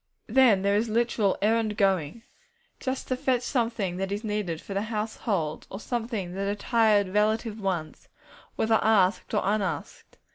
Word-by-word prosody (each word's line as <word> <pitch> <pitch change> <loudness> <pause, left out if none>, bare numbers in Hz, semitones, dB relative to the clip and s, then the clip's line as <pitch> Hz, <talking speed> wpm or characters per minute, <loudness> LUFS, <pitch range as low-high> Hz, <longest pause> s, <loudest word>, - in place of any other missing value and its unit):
Then 230 -5 +4
there 200 0 +2
is 220 +2 +1
literal 225 -3 +1
errand 220 -1 +1
going, 195 -1 +1 0.6
just 260 0 -3
to 255 - +1
fetch 250 -1 0
something 230 -8 -1
that 195 +1 -3
is 205 +3 -3
needed 210 -7 -2
for 200 - -8
the 195 - 0
household, 210 -7 -3
or 195 - -7
something 225 -6 -3
that 195 +1 -2
a 205 - -1
tired 210 -3 +2
relative 215 +2 0
wants, 180 -6 -3 0.5
whether 220 0 +2
asked 205 -3 +2
or 210 - +1
unasked. 205 -1 -3
210 Hz, 155 wpm, -27 LUFS, 195-225 Hz, 0.6 s, Then